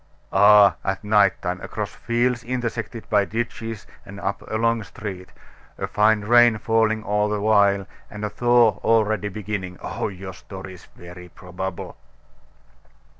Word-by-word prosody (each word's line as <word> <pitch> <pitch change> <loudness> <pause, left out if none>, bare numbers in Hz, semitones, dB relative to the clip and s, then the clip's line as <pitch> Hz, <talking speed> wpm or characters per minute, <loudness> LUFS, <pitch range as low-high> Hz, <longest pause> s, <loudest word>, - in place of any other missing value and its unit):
"Ah! 105 +1 +6
at 95 +1 -3
night 105 -3 +3
time 90 +1 -3
across - - -5
fields 120 +1 -1
intersected 120 -2 -4
by 105 -1 +3
ditches, 115 +1 -5 0.2
and 100 +1 -11
up 100 0 -3
a - - -3
long 115 0 +1
street 95 -2 -8 0.5
a - - -3
fine 105 0 +2
rain 120 +1 +5
falling 110 0 +1
all 105 0 0
the 105 0 -1
while, 100 -2 +3 0.2
and 105 0 -6
a - - -2
thaw 120 -1 +3
already 110 -2 +2
beginning! 95 -3 -5
Oh, - - -4
your 95 -1 -8
story 95 0 -10
is 90 - -14
very 90 0 -12
probable!" 90 +1 -7
105 Hz, 145 wpm, -23 LUFS, 95-115 Hz, 0.5 s, Ah